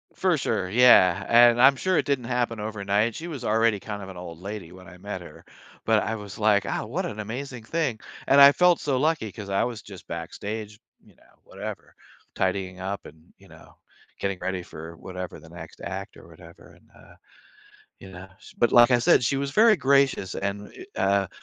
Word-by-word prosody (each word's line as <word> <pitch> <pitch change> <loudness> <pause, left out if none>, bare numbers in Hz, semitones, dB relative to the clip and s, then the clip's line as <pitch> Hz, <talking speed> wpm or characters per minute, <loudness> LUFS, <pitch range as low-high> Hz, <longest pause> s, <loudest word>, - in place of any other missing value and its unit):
For 185 -3 +1
sure, 105 -8 -2
yeah, 100 -5 +5
and 120 0 +6
I'm 135 +2 +7
sure 185 +6 0
it - - +1
didn't 140 -4 -1
happen 120 -2 -2
overnight, 105 +1 -1
she 165 - -7
was 145 -7 -7
already 110 -1 +2
kind 105 0 -7
of 95 - -9
an 95 - -10
old 85 -2 -9
lady 100 -2 -7
when 90 0 -14
I 90 -1 -13
met 100 -1 -6
her, 85 - -13 0.4
but 110 -1 +3
I 115 - -3
was 105 -2 -9
like, 105 -2 +2
"Ah, - - -3
what 165 - -3
an 110 - -8
amazing 120 +3 -6
thing," 135 -3 -2 0.3
and 140 - +5
I 140 0 +10
felt 180 +2 +3
so 140 -3 -1
lucky 145 -6 0
'cause 100 -2 -9
I 95 - +1
was 120 -4 -4
just 95 -4 -13
backstage, 105 +6 -6 0.2
you - - -22
know, - - -27
whatever, - - -9 0.4
tidying 95 -1 -2
up 95 +2 -5
and, 80 +2 -19
you - - -19
know, - - -17 0.4
getting 100 -1 -2
ready 95 -1 -3
for 80 -1 -10
whatever, 90 -1 -8
the 80 +1 -16
next 85 -1 -12
act - - -6
or - - -15
whatever, 85 0 -16
and, - - -26
uh, - - -18 0.8
you 95 - -12
know? 95 +1 -11 0.3
But 120 - +2
like 120 +1 +7
I 125 - +5
said, 120 - +4
she 135 - +1
was 140 0 -2
very 220 +8 +5
gracious 135 - +2
and 100 +1 -4 0.3
i - - -3
uh, 100 +1 +3
w 95 - -7
105 Hz, 205 wpm, -25 LUFS, 95-125 Hz, 0.8 s, I